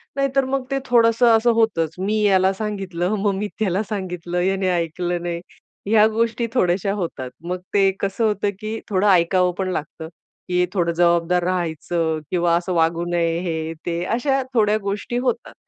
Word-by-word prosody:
नाहीतर 275 -1 +1
मग 270 0 -1
ते 275 - +1
थोडंसं 235 -1 +4
असं 235 +2 +3
होतंच, 195 -9 +1
मी 210 +3 0
याला 190 -2 +4
सांगितलं, 195 -2 -2
मग 200 -1 +1
मी 205 +2 -2
त्याला 200 0 0
सांगितलं, 180 -3 -3
याने 190 0 +1
ऐकलं 175 +1 -2
नाही, 170 -1 -3 0.5
ह्या 215 0 +5
गोष्टी 230 +1 0
थोड्याशा 195 -3 +1
होतात. 165 -10 -4 0.2
मग 180 0 -2
ते 195 -1 +4
कसं 200 +3 -1
होतं, 205 -1 +1
की 220 +1 -4
थोडं 200 0 +2
ऐकावं 180 0 +4
पण 185 -1 -1
लागतं, 160 0 -5 0.4
की 180 0 +2
थोडं 170 -3 +1
जबाबदार 170 +1 +2
राहायचं 165 -2 -1
किंवा 170 -1 +2
असं 180 +1 -3
वागू 165 +1 +1
नये, 170 -1 0
हे 160 -2 -3
ते. 170 0 -2
अशा 270 +7 0
थोड्या 215 -3 +3
गोष्टी 200 +4 -3
होतात. 265 - -2
185 Hz, 165 wpm, -21 LUFS, 175-215 Hz, 0.5 s, ह्या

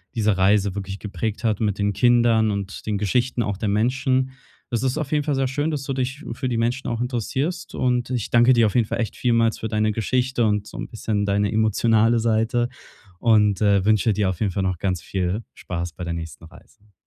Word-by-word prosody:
diese 105 -4 +1
Reise 100 0 +3
wirklich 100 -1 -5
geprägt 110 +1 -4
hat 110 -3 +1
mit 105 -3 -1
den 100 0 +1
Kindern 120 -1 +3
und 100 -1 -5
den 105 -1 -1
Geschichten 120 +4 0
auch 105 -3 -2
der 105 +1 -2
Menschen. 130 +4 +1 0.4
Es 120 0 -1
ist 130 +2 0
auf 155 -3 -3
jeden 150 -1 +1
Fall 145 - -1
sehr 135 0 +1
schön, 145 +4 -1
dass 145 -3 -3
du 135 - -3
dich 130 +3 -3
für 130 - -3
die 120 - -1
Menschen 120 +3 -1
auch 115 -1 -2
interessierst, 130 - -3
und 125 -1 0
ich 125 -4 -2
danke 120 +2 +5
dir 120 -2 +4
auf 105 - -1
jeden 115 -3 +3
Fall - - -3
echt 115 - -2
vielmals 115 -2 +1
für 110 - -3
deine 110 0 +1
Geschichte 125 +3 0
und 105 -1 0
so - - -10
'n - - -5
bisschen 110 -3 -2
deine 100 0 +1
emotionale 110 +1 +3
Seite 115 +2 +1 0.5
und, 105 -4 +3
äh, 100 -2 +3
wünsche 110 +1 +3
dir 100 -1 +1
auf 95 - -4
jeden 105 -3 +1
Fall 95 +2 -2
noch 95 -2 -1
ganz 90 -4 -1
viel 95 +3 -2
Spaß 85 -1 -5
bei 90 - -7
der 85 -1 -3
nächsten 85 -1 -7
Reise. 105 +5 -19
110 Hz, 220 wpm, -23 LUFS, 100-125 Hz, 0.5 s, danke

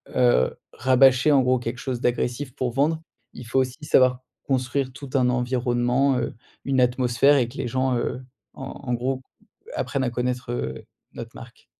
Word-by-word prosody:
heu, 120 - +3 0.2
rabâcher, 130 +3 +4
en 140 - +5
gros, 130 0 +2
quelque 120 +1 -4
chose 125 -1 -4
d'agressif 125 +2 -1
pour 125 -2 -2
vendre. 155 +4 +1 0.3
Il 125 - -10
faut 125 +3 +1
aussi 130 +4 -2
savoir 130 -2 +4 0.2
construire 130 0 -1
tout 140 -1 -9
un 125 -2 +3
environnement, 125 +1 +1
heu, - - -2 0.3
une 135 -2 +2
atmosphère 125 +3 +3
et 120 -3 +2
que 125 - -12
les - - -2
gens, 130 +1 0
heu, 125 +2 -3 0.3
en - - -9 0.3
en 125 - +1
gros, 130 +2 -2 0.5
apprennent 135 -1 -1
à 125 - 0
connaître, 125 0 -3
heu, 65 - -4 0.3
notre - - -9
marque. - - -13
125 Hz, 175 wpm, -24 LUFS, 125-135 Hz, 0.5 s, en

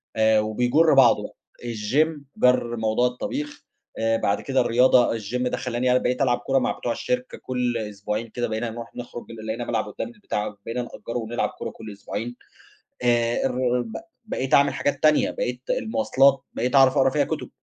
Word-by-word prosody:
آآ 110 0 +4
وبيجُر 125 +9 +3
بعضه 135 - +4 0.3
الGym 130 +7 0 0.2
جَر 125 -2 +3
موضوع 110 +3 +2
الطبيخ، 285 - -5 0.3
آآ 115 0 +2
بعد 100 -2 0
كده 135 -2 +1
الرياضة 120 0 +4
الGym 125 +5 -3
ده - - -2
خلّاني 125 0 -1
أنا 125 - +4
بقيت 125 +2 -1
ألعب 125 -2 +3
كورة 135 0 +1
مع - - 0
بتوع 120 - -3
الشركة 125 +2 -3
كلّ 125 -2 -1
أسبوعين 105 +1 -4
كده 120 +1 -2
بقينا 110 +1 -2
نروح 115 +1 -9
نخرج 120 -1 -8
لقينا 110 +1 -5
ملعب - - -1
قدّامنا 235 -3 -7
بتاع 105 0 -2 0.2
بقينا 120 +2 -2
نأجّره 120 0 -6
ونلعب 115 0 -2
كورة - - -6
كلّ 110 -2 -10
أسبوعين 120 +4 -6 0.7
آآ 120 0 +2
الر 125 -1 +1
ب 220 - -8 0.3
بقيت 135 -11 -3
أعمل 140 0 +5
حاجات 145 - -2
تانية، 155 -1 +4
بقيت - - -3
المواصلات 140 - +2
بقيت 125 +3 -1
أعرف 135 -1 +6
أقرا 135 0 +5
فيها 145 +1 +1
كُتب، - - -4
125 Hz, 175 wpm, -24 LUFS, 115-135 Hz, 0.7 s, أعرف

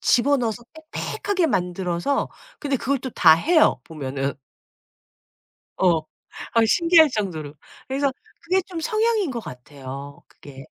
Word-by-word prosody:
집어 280 +4 +3
넣어서 240 -1 -2 0.3
빽빽하게 380 -4 -1
만들어서 180 - -1 0.3
근데 280 -2 0
그걸 270 +2 -1
또 260 0 -6
다 165 -6 +6
해요 315 - +3
보면은. 140 -3 -4 1.4
어. 175 -3 +4 0.5
아 230 -1 +4
신기할 335 +4 +5
정도로. 165 - -4 0.3
그래서 275 0 0 0.3
그게 370 +3 +2
좀 350 -3 -6
성향인 435 - +1
것 240 -2 -4
같아요 140 - -9
그게. 135 0 -13
230 Hz, 260 characters per minute, -23 LUFS, -, 1.4 s, 다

